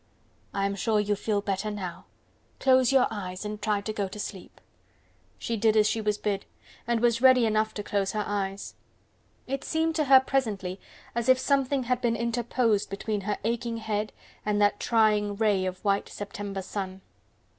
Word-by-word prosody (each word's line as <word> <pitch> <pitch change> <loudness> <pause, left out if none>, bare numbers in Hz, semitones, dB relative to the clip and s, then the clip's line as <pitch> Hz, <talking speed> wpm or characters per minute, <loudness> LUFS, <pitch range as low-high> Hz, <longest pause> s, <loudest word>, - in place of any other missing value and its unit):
I 195 0 -1
am 200 - 0
sure 210 +2 +1
you 210 0 +1
feel 205 0 -1
better 200 +1 -2
now. 190 -5 -6 0.5
Close 260 -2 +4
your 265 -2 +5
eyes 185 -2 -5
and 210 0 -5
try 210 -1 +1
to 215 +2 -4
go 205 -2 -1
to 190 - -9
sleep." 195 -2 -7 0.8
She 230 - -3
did 220 0 +3
as 210 -1 +5
she 225 - 0
was 210 -1 0
bid, 205 -2 -2 0.4
and 235 -1 +1
was 235 -1 +2
ready 260 -2 +6
enough 215 0 +1
to 205 - -4
close 200 -1 -1
her 210 -1 0
eyes. 195 -1 -3 0.7
It 275 +1 -3
seemed 320 0 0
to 305 - +2
her 265 -1 +8
presently 210 -9 -2 0.3
as 235 +1 -1
if 260 - +7
something 275 0 +1
had 250 0 0
been 235 -2 +1
interposed 235 -2 0
between 205 +1 -3
her 205 +1 -2
aching 230 +1 -1
head 215 -1 -2 0.3
and 210 -1 0
that 205 0 +3
trying 210 -3 +2
ray 200 -3 +2
of 185 +3 -6
white 200 0 +1
September 200 -1 -5
sun. 190 -1 -5
215 Hz, 180 wpm, -27 LUFS, 200-235 Hz, 0.8 s, her